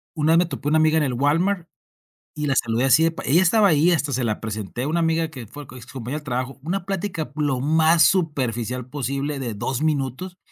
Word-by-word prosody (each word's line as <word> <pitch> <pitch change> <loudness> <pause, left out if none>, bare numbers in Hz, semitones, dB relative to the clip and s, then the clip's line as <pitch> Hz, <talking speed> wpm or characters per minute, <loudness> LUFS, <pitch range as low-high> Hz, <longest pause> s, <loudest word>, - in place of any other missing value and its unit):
una 155 +1 +1
vez 165 - +5
me 175 - +3
topé 145 -3 -4
una 155 - +3
amiga 155 0 +3
en 155 - +2
el 130 -3 -1
Walmart 165 +7 +1 0.7
y 150 -1 -4
la 135 - +1
saludé 115 +2 +1
así 135 +5 +5
de 165 - +3
p 175 - -8
ella 170 +6 +5
estaba 200 +3 +4
ahí, 160 +4 +4
hasta 150 -4 0
se 125 0 -1
la 110 -2 -1
presenté, 110 +2 -5
a - - -2
una 170 +2 0
amiga 165 0 +1
que 125 -8 -9
fue 145 +5 -10
es 120 - -11
compañera 130 +4 -5
de - - -18
trabajo. 130 +1 -3
Una 175 +2 -3
plática 190 -4 -3
lo 145 -4 0
más 160 +2 +4
superficial 125 - 0
posible 140 +1 -3
de 120 -4 -4
2 125 +6 -3
minutos. 155 +5 -2
150 Hz, 230 wpm, -22 LUFS, 130-165 Hz, 0.7 s, vez